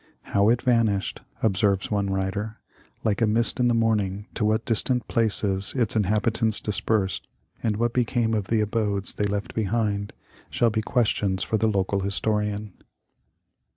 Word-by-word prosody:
" - - -46
How 100 +1 +4
it 120 +1 +2
vanished," 115 -5 +1 0.2
observes 100 -2 +1
one 100 -1 0
writer, 95 +3 -2 0.2
" - - -32
like 105 -1 +1
a 115 - +4
mist 115 +4 +1
in 125 - +3
the 120 - +2
morning, 105 -3 0
to 115 - -2
what 110 +1 +1
distant 125 +2 +1
places 100 -3 +1
its 115 -4 +1
inhabitants 110 +2 +1
dispersed, 105 -1 0 0.3
and 110 -2 0
what 120 +1 0
became 120 -2 +1
of 105 -3 -1
the 115 -1 +2
abodes 105 -2 -1
they 105 - -1
left 100 0 -3
behind, 105 -1 -1 0.4
shall 120 -1 +2
be 110 0 0
questions 105 -4 0
for 110 - 0
the 110 - +2
local 100 -1 0
historian." 105 +1 -1
105 Hz, 160 wpm, -25 LUFS, 100-115 Hz, 0.4 s, How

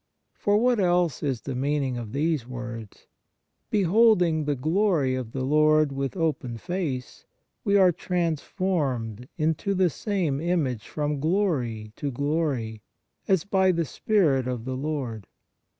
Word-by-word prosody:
For 205 0 +1
what 245 +1 +3
else 175 -4 +2
is 135 -6 -1
the 135 - -5
meaning 135 0 0
of 115 -3 -6
these 150 -3 0
words: 120 -4 -8 0.3
" - - -51
Beholding 185 -5 +3
the 145 -1 0
glory 155 -1 +1
of 130 -3 -4
the 130 +1 -3
Lord 155 +1 +4
with 135 +5 -3
open 145 -8 -1
face, 160 -5 -4 0.4
we 200 0 +3
are 185 -2 +6
transformed 155 - -2
into 160 +6 0
the 185 -2 +3
same 170 -7 -1
image 155 - -1
from 150 -1 -2
glory 135 - -1
to 145 - -2
glory, 140 -6 -1 0.5
as 190 -5 +3
by 190 -2 +3
the 170 -2 0
Spirit 145 - +1
(rf 125 -2 -3
the 130 0 -3
Lord 130 - -4
150 Hz, 140 wpm, -26 LUFS, 130-180 Hz, 0.5 s, are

